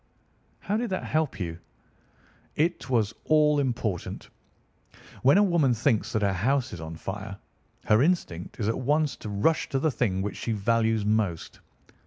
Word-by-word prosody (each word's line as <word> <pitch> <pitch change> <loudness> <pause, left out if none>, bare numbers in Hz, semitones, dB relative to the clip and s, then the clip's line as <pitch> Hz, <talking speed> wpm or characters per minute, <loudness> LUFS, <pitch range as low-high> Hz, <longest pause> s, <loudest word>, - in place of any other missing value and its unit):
"How 205 +2 -1
did 235 0 -2
that 185 - -2
help 155 -5 -1
you?" 85 -2 -4 1.0
"It 160 -4 0
was 115 -4 +1
all 150 -1 +4
important. 115 -9 -3 0.9
When 135 +7 +5
a 205 - +6
woman 165 -10 +3
thinks 115 -1 +1
that 110 - +1
her 100 -1 +2
house 130 +6 0
is 85 - -7
on 80 0 -7
fire, 95 +3 -6 0.5
her 105 +2 +4
instinct 135 - -1
is 105 - -1
at 115 - 0
once 145 +2 +1
to 110 - -7
rush 105 +11 +1
to 135 - 0
the 155 +3 +1
thing 95 -7 0
which 100 -1 -4
she 115 - -2
values 110 0 +1
most. 105 -6 -1
115 Hz, 165 wpm, -27 LUFS, 100-150 Hz, 1.0 s, a